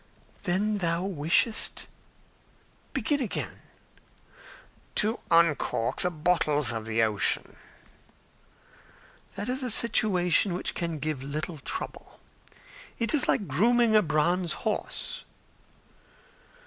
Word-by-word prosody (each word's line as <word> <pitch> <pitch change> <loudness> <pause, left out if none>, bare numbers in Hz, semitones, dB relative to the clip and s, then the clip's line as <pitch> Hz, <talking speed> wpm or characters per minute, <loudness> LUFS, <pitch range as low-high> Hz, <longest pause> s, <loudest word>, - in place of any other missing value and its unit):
"Then 205 +3 0
thou 170 -1 0
wishest? 190 +5 +2 1.1
Begin 290 -2 0
again." 235 - -4 1.4
"To 220 +3 +1
uncork 165 -8 +2
the 180 - +5
bottles 155 -4 +1
of 110 -1 -4
the 115 0 +1
ocean." 105 -2 +1 1.8
"That 200 +1 -4
is 255 +2 -1
a 250 - -1
situation 195 -5 +3
which 180 - -3
can 170 -2 -3
give 150 -2 -3
little 150 +3 -5
trouble. - - -6 0.8
It 230 +4 -1
is 295 - +2
like 205 - +1
grooming 225 - +3
a 215 - +7
bronze 170 +2 +1
horse." 215 - -2
175 Hz, 100 wpm, -27 LUFS, 150-215 Hz, 1.8 s, a